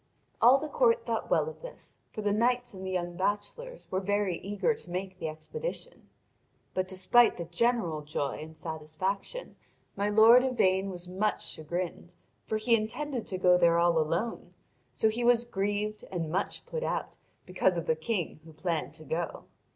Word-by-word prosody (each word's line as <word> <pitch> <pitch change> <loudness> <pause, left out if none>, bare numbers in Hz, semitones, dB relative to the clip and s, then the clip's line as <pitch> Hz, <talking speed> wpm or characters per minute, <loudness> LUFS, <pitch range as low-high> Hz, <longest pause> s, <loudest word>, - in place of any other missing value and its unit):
All 245 +4 +8
the 300 +3 -4
court 470 +4 +3
thought - - -2
well - - +3
of 475 - -8
this, - - -9
for 215 - -5
the 205 - +2
knights 245 +2 +1
and 190 -1 -8
the 190 - -3
young 175 -2 -2
bachelors 210 - -3
were 185 - +1
very 200 -2 0
eager 200 +2 0
to 200 - -11
make 185 +1 -4
the 160 - -2
expedition. 465 - -6 0.6
But 185 0 0
despite 190 +6 +4
the 170 - -4
general 175 -3 0
joy 145 -2 -3
and 160 +1 -10
satisfaction 170 - -4 0.4
my 200 +1 0
lord 225 +4 +8
Yvain 195 -7 +2
was 180 -1 -7
much 195 +4 -1
chagrined, 175 +2 -5 0.3
for 220 - 0
he 230 +2 +3
intended 235 +4 -3
to 185 - -3
go 180 -1 +5
there 170 -1 +5
all 170 -1 +4
alone; 170 +9 -2 0.4
so - - +2
he 225 +3 -1
was 240 0 +4
grieved 205 0 -2
and 165 -4 -3
much 190 +4 -2
put 485 - -4
out - - -2 0.3
because 180 0 +1
of 170 - -2
the 160 - +2
King 170 -1 -2
who 160 -1 -13
planned 165 0 -2
to 155 - -12
go. 165 +3 -3
190 Hz, 175 wpm, -30 LUFS, 175-230 Hz, 0.6 s, All